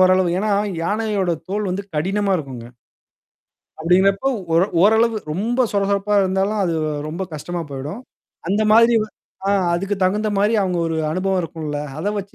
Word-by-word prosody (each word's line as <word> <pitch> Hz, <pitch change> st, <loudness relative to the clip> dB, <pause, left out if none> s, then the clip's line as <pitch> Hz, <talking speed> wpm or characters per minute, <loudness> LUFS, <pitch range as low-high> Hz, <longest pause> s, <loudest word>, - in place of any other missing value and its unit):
ஓரளவு. 185 Hz, -1 st, +4 dB
ஏன்னா, 215 Hz, +1 st, 0 dB, 0.3 s
யானையோட 205 Hz, -1 st, 0 dB, 0.2 s
தோல் 205 Hz, 0 st, -1 dB
வந்து 195 Hz, +2 st, -2 dB
கடினமா 195 Hz, +6 st, 0 dB
இருக்குங்க. 130 Hz, -7 st, -7 dB, 1.1 s
அப்டிங்கிறப்போ 195 Hz, +8 st, +3 dB, 0.3 s
ஒர 170 Hz, -, +5 dB, 0.2 s
ஓரளவு 220 Hz, +2 st, +4 dB, 0.2 s
ரொம்ப 230 Hz, +9 st, -1 dB
சொர 200 Hz, -1 st, +1 dB
சொரப்பா 200 Hz, +1 st, +1 dB
இருந்தாலும் 190 Hz, +3 st, 0 dB
அது 170 Hz, -2 st, 0 dB, 0.3 s
ரொம்ப 170 Hz, +5 st, -4 dB
கஷ்டமா 175 Hz, +4 st, -4 dB
போயிடும். 140 Hz, -, -6 dB, 0.5 s
அந்த 205 Hz, +3 st, +2 dB
மாதிரி 230 Hz, +2 st, +6 dB
வ 215 Hz, -, -3 dB, 0.4 s
ஆ -, -, +3 dB, 0.2 s
அதுக்கு 195 Hz, +4 st, -1 dB
தகுந்த 210 Hz, +4 st, +1 dB
மாரி 210 Hz, +3 st, +2 dB
அவுங்க 180 Hz, -2 st, -1 dB
ஒரு 160 Hz, -, -2 dB
அனுபவம் 185 Hz, +2 st, 0 dB
இருக்கும்ல. 155 Hz, -3 st, -4 dB, 0.2 s
அத 160 Hz, -, -5 dB
வச்சு 195 Hz, 0 st, -7 dB
195 Hz, 150 wpm, -20 LUFS, 175-210 Hz, 1.1 s, மாதிரி